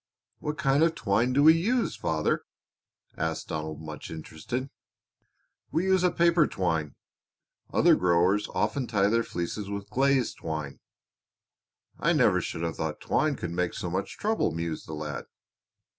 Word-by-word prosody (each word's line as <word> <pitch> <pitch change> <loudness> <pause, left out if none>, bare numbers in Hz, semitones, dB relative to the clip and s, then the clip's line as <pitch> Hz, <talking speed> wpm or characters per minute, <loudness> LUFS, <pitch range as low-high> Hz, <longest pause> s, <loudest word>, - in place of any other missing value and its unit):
"What 150 +1 -3
kind 140 -2 +2
of 165 0 +3
twine 115 0 +1
do 140 +3 +3
we 160 +1 +9
use, 230 +9 +1
father?" 80 -1 0 0.7
asked 80 0 -3
Donald, 80 0 -4
much 75 -1 -7
interested. 80 - -5 1.0
"We 165 - +1
use 190 -1 +3
a 180 - +5
paper 170 -2 +4
twine. 80 -6 -1 0.8
Other - - +5
growers 90 +3 +3
often 135 -4 0
tie 100 -3 +2
their 115 +2 +3
fleeces 95 +1 -4
with 100 0 -5
glazed 135 +1 +2
twine." 75 -3 -4 1.2
"I - - +3
never - - +4
should 80 - -4
have 85 -1 -2
thought - - -3
twine 155 -2 +1
could 90 - -5
make 90 0 -1
so 90 - -4
much 95 +2 -3
trouble," 220 +1 +1
mused 85 -1 -4
the 80 - -6
lad. 75 -1 -5
100 Hz, 150 wpm, -28 LUFS, -, 1.2 s, we